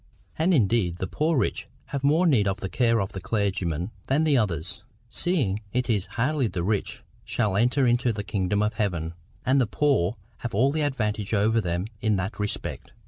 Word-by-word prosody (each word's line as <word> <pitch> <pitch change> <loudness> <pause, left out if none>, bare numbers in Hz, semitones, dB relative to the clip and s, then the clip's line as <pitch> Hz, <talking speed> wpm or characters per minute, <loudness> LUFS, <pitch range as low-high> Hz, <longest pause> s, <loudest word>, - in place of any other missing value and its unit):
And 165 +4 +2
indeed 110 - +2
the 95 - -2
poor 155 - 0
rich - - -1 0.2
have 140 -1 -3
more 155 +6 +4
need 125 - +4
of 95 +1 -1
the 95 - -4
care 115 -1 +2
of 100 -1 -2
the 95 - -6
clergyman 95 -4 -1 0.2
than 140 +4 +2
the 155 -3 +3
others, 90 - -1 0.2
seeing 120 - 0
it 125 -1 +1
is 100 -4 0
hardly 135 +2 +2
that - - -8
the 85 - -1
rich 105 +1 -2 0.2
shall 105 -5 0
enter 125 +6 +3
into 120 0 +3
the 105 -2 -4
kingdom 100 +1 0
of 105 +2 0
heaven, 90 -7 -1 0.3
and 130 +2 +4
the 120 - +1
poor 130 -7 +2 0.2
have 120 -4 -5
all 130 +6 +4
the 155 +1 -1
advantage 110 -7 -1
over 110 +3 +3
them 85 -1 -1 0.2
in 110 -2 +2
that 95 +3 -3
respect. 105 0 -4
110 Hz, 195 wpm, -26 LUFS, 95-130 Hz, 0.3 s, more